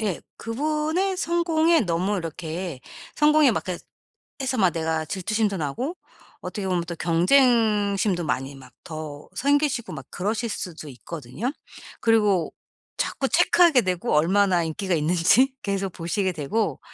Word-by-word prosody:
예. 205 -6 -2 0.2
그분의 310 +9 -1
성공에 335 -2 +2
너무 185 +2 0
이렇게 165 -2 -5 0.4
성공에 300 -2 +5
막 220 - -2
그래 180 -2 -4 0.6
해서 260 -2 -1
막 185 -3 +4
내가 160 -1 -1
질투심도 200 +4 -1
나고 245 - -3 0.4
어떻게 200 -3 -5
보면 180 -2 +1
또 170 - -5
경쟁심도 205 - +3
많이 135 0 -2
막 130 -2 -15
더 155 -3 -8
생기시고 285 - +1
막 135 -3 -8
그러실 215 +5 -2
수도 165 -6 -5
있거든요. 150 - -5 0.5
그리고 210 -6 +2 0.5
자꾸 - - -1
체크하게 335 -8 +5
되고 180 -2 -1
얼마나 180 +3 +3
인기가 185 +3 -2
있는지 180 - +3
계속 195 -1 -2
보시게 185 +3 -1
되고 175 +8 -2
195 Hz, 300 characters per minute, -24 LUFS, 165-245 Hz, 0.6 s, 성공에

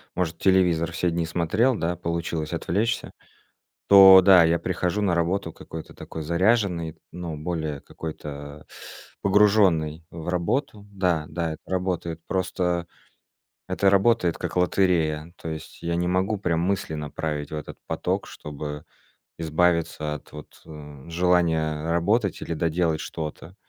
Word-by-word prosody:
может, 85 -2 -1
телевизор 85 -3 +2
все 90 +1 0
дни 85 0 -1
смотрел, 90 +10 +1
да, 85 -3 -2
получилось 85 -2 -3
отвлечься, 105 +7 -1 0.8
то 95 -1 +10
да, 95 -1 +7
я 85 +1 +3
прихожу 90 +2 -1
на 100 -4 +2
работу 85 0 -1
какой-то 80 0 -10
такой 80 - -7
заряженный, 85 -1 +1 0.2
ну, 85 -3 -5
более 80 -2 -3
какой-то 75 -2 -8 0.5
погружённый 95 -6 +3
в 80 -1 -8
работу. 100 - -1
Да-да, 85 -3 -1
это 80 - -10
работает. 90 -3 -2
Просто 90 -2 -1 0.8
это 100 - +2
работает 100 -3 +3
как - - -5
лотерея. 85 -4 +1
То - - -6
есть 80 -1 -8
я 85 0 -1
не 90 +1 0
могу 95 +4 +1
прям 85 -4 -1
мысли 95 -1 -1
направить 75 0 -4
в - - -3
этот 75 - -7
поток, - - -2
чтобы 75 0 -7 0.5
избавиться 80 -2 0
от 75 - -11
вот, 75 0 -12
э, 75 -1 -11
желания 85 -3 +1
работать 100 +5 +1
или 85 - -4
доделать 80 -1 0
что-то. 80 +2 -6
85 Hz, 130 wpm, -25 LUFS, 80-95 Hz, 0.8 s, то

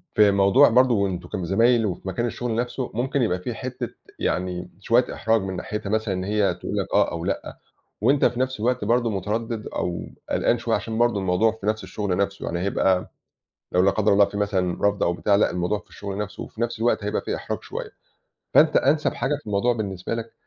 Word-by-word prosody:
في 105 -1 +6
موضوع 100 +8 +5
برضه 120 -4 +4
أنتم 90 -2 -5
كان 90 - -3
زمايل 115 +5 +3
وفي 95 -1 -4
مكان 95 +6 -1
الشغل 120 -1 -3
نَفسُه، 120 +2 -2
ممكن 130 +4 0
يبقى 90 -6 +1
في 90 - -4
حتة - - -5 0.3
يعني 90 0 -2
شوية 115 +5 +2
إحراج 110 -1 +1
من 95 -1 -4
ناحيتها 105 +2 -4
مثلًا 110 -1 0
إن 90 0 -3
هي 105 0 +1
تقول - - -5
لَك - - -1
آه - - +3
أو 85 0 -4
لأ، 100 - -3 0.4
وأنت 140 0 +4
في 120 - +1
نفس 130 -2 -1
الوقت 120 0 0
برضه، 120 +2 +2
مُترَدِّد 110 +3 -3
أو 85 -1 -3 0.3
قلقان - - +2
شوية - - 0
عشان 110 -1 -3
برضه 120 -3 +2
الموضوع 95 +4 +2
في 110 -2 -8
نفس 110 0 0
الشغل 100 -4 -2
نَفسُه 100 0 -1
يعني 85 - -2
هيبقى 95 0 +1 0.6
لو 90 - +3
لا 95 +1 +4
قدر 105 +1 +2
الله 100 0 +6
في 100 +1 -6
مثلًا 95 -4 0
رفض 100 0 0
أو 85 - +2
بتاع، 100 +3 +2
لأ 100 - +3
الموضوع 90 +4 -1
في - - -24
الشُغل 100 -1 -6
نَفسُه 105 -1 -5
وفي 110 - -9
نفس 120 -1 -2
الوقت 115 -2 +1
هيبقى 105 +1 -1
في - - -3
إحراج - - -4
شوية. - - -6 0.6
فأنت 155 0 +6
أَنسَب 150 +3 +2
حاجة 135 +2 0
في - - -29
الموضوع 105 +4 +2
بالنسبة 100 -3 -3
لَك 115 0 -5
105 Hz, 215 wpm, -24 LUFS, 95-115 Hz, 0.6 s, في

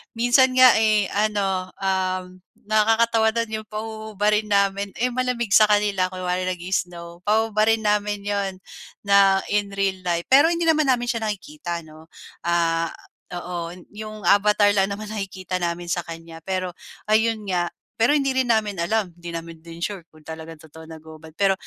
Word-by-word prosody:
minsan 255 +2 +4
nga, 255 -1 +8
eh, 215 -3 +2
ano, 200 -3 0
um, 185 -1 -2 0.2
nakakatawa 220 +1 +2
dun 220 -2 -1
yung 215 - -13
pahububarin 215 -1 -2
namin, 200 -1 +1
eh, 250 +1 0
malamig 245 -3 -2
sa 215 +1 +7
kanila 205 -3 +2
kunwari 185 0 -3
nag-i-snow. 175 -1 -4
Pahuhubarin 220 +1 +2
namin 210 -1 0
yun 200 -2 -2 0.5
na 195 -1 +4
in 205 0 +1
real 195 -1 -1
life, 175 -2 -1
pero 285 +4 +7
hindi 340 0 0
naman 310 -3 +3
namin 250 -2 +2
siya 225 -2 -3
nakikita 210 - -5
ano. 155 0 -15 0.3
Ah, 165 -1 +1 0.5
oo, 175 -1 -5 0.2
yung 215 -1 -8
avatar 205 +2 +4
lang 195 -1 +2
naman 210 +1 -6
nakikita 190 -3 -4
namin 175 0 -3
sa 175 0 -2
kanya, 165 0 -9
pero 185 +1 -3 0.4
ayun 220 0 +2
nga, 175 -1 +1 0.3
pero 230 - +4
hindi 275 -2 0
rin 260 -2 +1
namin 210 -5 0
alam. 195 0 -1
Di 175 0 -9
namin 165 -1 -7
din 165 0 -11
sure 190 +1 -4
kung 155 -1 -20
talagang 160 0 -9
totoo 160 +1 -14
naghuhubad, 160 0 -12
pero 195 -1 +3
200 Hz, 160 wpm, -23 LUFS, 175-220 Hz, 0.5 s, nga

